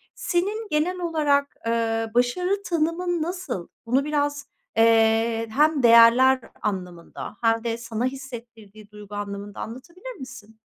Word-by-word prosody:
senin 410 +5 -1
genel 330 +5 0
olarak, 295 -5 +1
eee, 225 -1 0
başarı 360 +12 +1
tanımın 340 0 -1
nasıl? 345 - -4 0.2
Bunu 260 +4 +1
biraz, 290 -1 -1 0.3
eee, 225 0 +3
hem 300 +2 +2
değerler 240 +3 +7 0.2
anlamında 180 +1 -5
hem 225 -1 +2
de 230 -1 -2
sana 230 0 -3
hissettirdiği 235 -6 -8
duygu 210 -1 -10
anlamında 200 0 -6
anlatabilir 340 - -8
misin? 225 -4 -11
245 Hz, 115 wpm, -24 LUFS, 225-305 Hz, 0.3 s, değerler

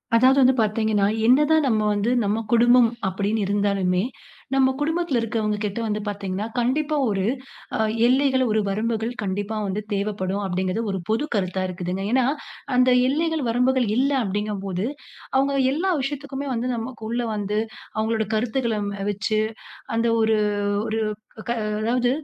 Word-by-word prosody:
அதாவது 260 +3 +5
வந்து 260 0 +6
பார்த்தீங்கன்னா, 215 -1 +1 0.2
என்னதான் 300 +4 +4
நம்ம 220 -3 +2
வந்து 205 +3 0
நம்ம 205 +2 0
குடும்பம் 240 0 +6 0.2
அப்பிடீன்னு 200 +3 -1
இருந்தாலுமே, 200 -2 +1 0.5
நம்ம 265 -1 +4
குடும்பத்தில 320 -3 0
இருக்கிறவங்கக்கிட்ட 210 -2 -2
வந்து 210 -1 -1
பார்த்தீங்கன்னா, 200 0 -3
கண்டிப்பா 290 +6 +1
ஒரு 195 -2 0 0.5
அ - - -5 0.3
எல்லைகள், 260 0 +3
ஒரு 215 - +2
வரம்புகள் 225 +3 -1
கண்டிப்பா 205 +2 -2
வந்து 195 +2 -2
தேவைப்படும், 200 -1 -2
அப்பிடிங்கிறது, 185 +3 -1
ஒரு 190 - -2
பொது 225 +7 +1
கருத்தா 190 -1 -1
இருக்குதுங்க. 180 +1 -4
ஏன்னா, 255 0 +3 0.5
அந்த 250 0 +5 0.2
எல்லைகள் 320 +2 0
வரம்புகள் 250 +1 +2
இல்ல 275 +3 +2
அப்பிடிங்கம்போது 200 -2 -2 0.5
அவுங்க 275 +1 +2 0.2
எல்லா 360 +7 0
விஷயத்துக்குமே 280 0 -4
வந்து 240 +1 -2
நமக்குள்ள 230 0 -4
வந்து, 205 0 -2 0.4
அவுங்களோட 220 0 0
கருத்துக்கள 235 0 0 0.3
வச்சு, 210 +2 -1 0.6
அந்த 230 +1 +2 0.2
ஒரு, 220 0 +3 0.5
ஒரு 220 0 -1 0.5
க - - 0 0.3
அதாவுது 245 +2 +1
220 Hz, 130 wpm, -23 LUFS, 205-255 Hz, 0.6 s, வந்து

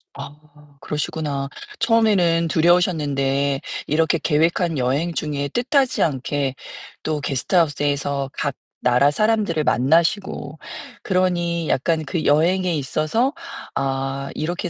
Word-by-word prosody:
아 140 +1 -8 0.5
그러시구나. 150 -2 -3 0.3
처음에는 205 -8 +3
두려우셨는데 145 -5 +2 0.3
이렇게 160 +2 +2
계획한 165 +1 +1
여행 135 +7 0
중에 145 -3 -2
뜻하지 260 - +1
않게 140 -2 -1 0.5
또 155 -1 -2
게스트하우스에서 145 -1 0
각 140 -2 -2 0.3
나라 125 +3 +4
사람들을 210 -4 +1
만나시고 155 - +1 0.4
그러니 175 -3 0
약간 160 +4 +1
그 155 +3 -3
여행에 175 +4 +2
있어서 155 - 0 0.4
아 135 0 -2
이렇게 175 +3 -3
155 Hz, 275 characters per minute, -21 LUFS, 140-175 Hz, 0.5 s, 나라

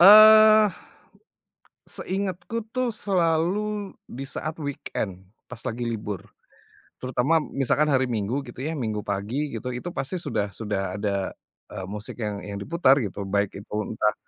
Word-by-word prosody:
Eee, 215 +2 +10 1.2
seingatku 200 +4 -3
tuh 255 -1 +1
selalu 195 +2 0
di 135 +3 -6
saat 155 +3 -4
weekend 105 -9 -4 0.2
pas 125 - -8
lagi 120 -1 -3
libur, 105 -4 -4 0.7
terutama 130 +5 +2
misalkan 140 +1 +1
hari 130 -3 +2
Minggu 115 +5 -1
gitu 120 -3 -12
ya 160 - -2
Minggu 110 -6 -2
pagi 105 +9 -2
gitu, 125 - -4
itu 125 +8 -4
pasti 135 +7 -2
sudah 110 - -1
sudah 95 -2 -3
ada, 100 -2 -1 0.4
eee, 95 - -5
musik 105 +4 -7
yang 105 -2 -3
yang 100 -1 -5
diputar 145 - +4
gitu. 100 -3 -3
Baik 100 0 0
itu 105 - -10
entah 105 -1 +1
130 Hz, 140 wpm, -25 LUFS, 105-175 Hz, 1.2 s, Eee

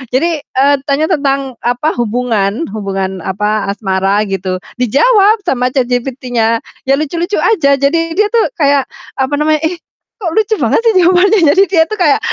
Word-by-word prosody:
Jadi, 325 +2 +1
eee, 280 +2 +2
tanya 290 +3 0
tentang, 275 -3 -1
apa, 245 +6 0
hubungan 230 +1 -1
hubungan, 195 -2 -3
apa, 210 +2 -2
asmara 195 0 0
gitu, 190 -1 -3 0.2
dijawab 410 - +3
sama 250 -1 +1
ChatGPT-nya, 245 -3 -1 0.3
ya 275 - +4
lucu-lucu 340 +6 -2
saja. 315 -11 +2
Jadi, 330 +4 0
dia 425 - +4
itu 465 - +3 0.2
kayak 280 -2 +2 0.3
apa 265 +2 -1
namanya, 305 0 +1
"Ih, 350 +2 -2 0.4
kok 340 -5 -2
lucu 435 0 +2
banget - - +2
sih 455 - +4
jawabannya?" 370 +4 +4
Jadi 385 - +5
dia 340 -4 +3
itu 430 - -4
kayak 345 -4 +3
275 Hz, 155 wpm, -13 LUFS, 225-335 Hz, 0.4 s, Jadi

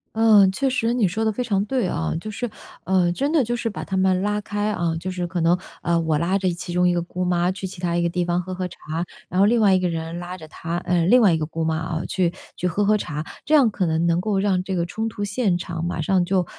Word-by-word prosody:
嗯， 215 -4 +6
确 270 +8 0
实 235 -2 0
你 235 -5 +2
说 220 +5 -2
得 220 - +2
非 230 +4 -2
常 205 -4 0
对 250 -3 0
啊。 80 - -2
就 215 - -6
是， 230 +4 -3 0.4
嗯， 180 -2 +2
真 280 +7 0
的 315 -4 +3
就 240 +1 -1
是 235 - -3
把 220 - -4
她 190 - -3
们 185 -1 +2
拉 210 +1 0
开， 205 +1 -2
啊， 170 -5 -1
就 180 +3 -5
是 180 -1 -3
可 175 0 -3
能， 170 +2 +4 0.2
呃， 170 -1 +1
我 160 -2 +1
拉 180 +4 +1
着 185 -2 0
其 175 +1 -7
中 180 +1 +3
一 175 - +3
个 175 - 0
姑 180 +1 -4
妈 175 0 +1
去 190 +1 -6
其 185 -1 -8
他 170 -1 0
一 175 - +1
个 170 - +1
地 180 +1 -1
方 175 0 0
喝 185 +1 -6
喝 185 0 -3
茶。 180 - -14 0.5
然 180 - -2
后 - - +7
另 235 +2 +3
外 205 -3 +5
一 185 - +4
个 180 -1 0
人 165 +1 -4
拉 175 +1 -6
着 160 -3 -11
她 165 +2 -4
呃， 180 -2 +1
另 250 +6 +6
外 205 -7 +5
一 - - +2
个 155 - -2
姑 165 0 -3
妈 160 0 0
啊， 160 +1 -3
去 180 -3 +1 0.2
去 180 - -1
喝 200 +4 0
喝 215 +1 +4
茶。 150 -7 -3 0.2
这 310 - +3
样 265 -7 +5
可 190 -3 -1
能 160 +1 +1
能 170 +1 +2
够 205 +1 0
让 190 -2 +1
这 190 0 -3
个 170 -1 0
冲 220 +6 -3
突 205 -1 -5
现 205 -2 0
场 170 -2 -5
马 170 -1 -2
上 180 +3 +2
就， 185 0 +1
185 Hz, 310 characters per minute, -23 LUFS, 170-205 Hz, 0.5 s, 后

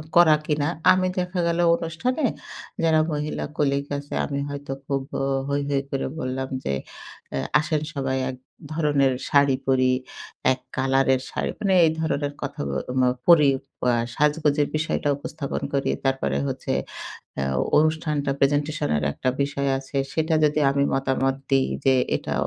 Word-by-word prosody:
করা 170 -3 +7
কিনা। 150 -1 0 0.2
আমি 185 0 +3
দেখা 180 0 -2
গেল 170 0 0 0.2
অনুষ্ঠানে 170 - -2 0.6
যারা 160 -1 +4
মহিলা 150 0 -2
কলিগ 140 -1 +1
আছে, 145 0 -8
আমি 140 -1 -3
হয়তো 140 -1 -6
খুব 135 0 -1 0.2
অ - - 0 0.3
হৈ, 140 0 0
হৈ 140 -1 +2
করে 135 - -2
বললাম 130 0 -3
যে - - -1 0.6
এ - - 0 0.2
"আসেন 155 0 -1
সবাই 135 -2 -1
এক 130 - -5 0.4
ধরনের 145 -4 +2 0.2
শাড়ি 140 -2 +4
পড়ি, 130 -1 +3 0.6
এক 130 - -1 0.2
কালার 135 0 +2
এর 130 - 0
শাড়ি," - - -2
মানে 195 -2 +1
এই 160 - +3
ধরনের 145 -3 -1
কথা 140 0 -4
ব - - -2 0.3
ম - - +4 0.2
পড়ি 155 -5 +7 0.4
আ - - +5 0.2
সাজগোজের 150 -1 +2
বিষয়টা 155 -1 0
উপস্থাপন 145 0 -5
করি। 140 -1 +1 0.2
তারপরে 135 - 0
হচ্ছে - - -3 0.7
আ - - 0 0.4
অনুষ্ঠানটা 155 -2 +1
প্রেজেন্টেশন 145 +2 +1
এর 75 - -1
একটা 130 - -3
বিষয় 140 0 -1
আছে, 135 +1 -8 0.2
সেটা 160 0 +1
যদি 150 0 +2
আমি 140 0 +2
মতামত 135 0 +1 0.2
দিই 135 -1 +3 0.2
যে, 135 - +5 0.2
"এটা - - -5
145 Hz, 155 wpm, -24 LUFS, 135-155 Hz, 0.7 s, করা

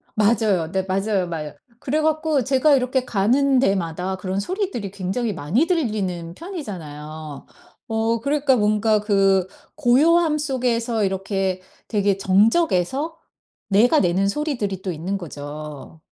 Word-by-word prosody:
맞아요. 205 -6 +2
네, 190 0 0
맞아요. 195 0 0
마요. 155 -3 -5 0.3
그래 300 +4 -1
갖고 310 -2 +1
제가 270 +3 +4
이렇게 255 0 0
가는 255 +6 +2
데마다 185 -4 0
그런 190 +1 -3
소리들이 365 - -3
굉장히 200 +4 -2
많이 185 - 0
들리는 200 - -1
편이잖아요. 160 - -8 0.4
어 225 +1 0
그러니까 280 0 +2
뭔가 215 -1 +2
그 195 -3 +2 0.3
고요함 305 +4 +3
속에서 245 -6 -1
이렇게 190 -1 -2 0.3
되게 200 -3 +1
정적에서 225 - +2 0.5
내가 235 +10 +4
내는 185 +2 +2
소리들이 205 - -2
또 190 - -3
있는 180 +5 -3
거죠. 150 -2 -8
205 Hz, 290 characters per minute, -22 LUFS, 185-260 Hz, 0.5 s, 제가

